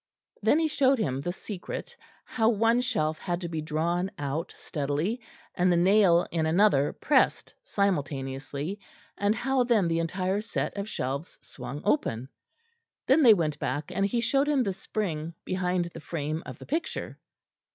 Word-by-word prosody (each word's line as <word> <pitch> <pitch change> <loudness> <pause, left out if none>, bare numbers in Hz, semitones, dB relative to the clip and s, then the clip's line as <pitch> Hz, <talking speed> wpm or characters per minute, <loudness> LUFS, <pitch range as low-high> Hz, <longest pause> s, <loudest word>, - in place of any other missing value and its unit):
Then 220 +8 +4
he 325 0 +2
showed 275 -3 +3
him 135 - -1
the 175 - -2
secret, 205 - -7 0.3
how 225 -2 +2
one 230 +2 +3
shelf 160 -12 0
had 175 -1 -2
to 175 - -3
be 160 -2 -3
drawn 170 +4 -1
out 145 +4 -3
steadily, 155 - -2 0.3
and 180 0 +2
the 175 - +3
nail 180 -1 +5
in 160 -2 0
another 160 -5 +4
pressed 275 -3 +1
simultaneously, 145 -2 -2 0.4
and 205 +2 +1
how 265 +2 +1
then 230 -7 +3
the 165 0 +1
entire 185 +4 -1
set 220 - -3
of 200 +1 -4
shelves 140 +3 -4
swung 130 +3 -8
open. 130 - 0 0.8
Then 270 +5 +5
they 230 -6 +8
went 155 -4 -1
back 145 +4 -3
and 195 - 0
he 220 +4 +1
showed 275 +5 +2
him 280 -4 +3
the 195 -4 -1
spring 170 -5 -3
behind 180 -1 -1
the - - -7
frame 155 +1 -3
of - - -7
the - - -11
picture. 325 +4 -3
180 Hz, 160 wpm, -28 LUFS, 155-220 Hz, 0.8 s, they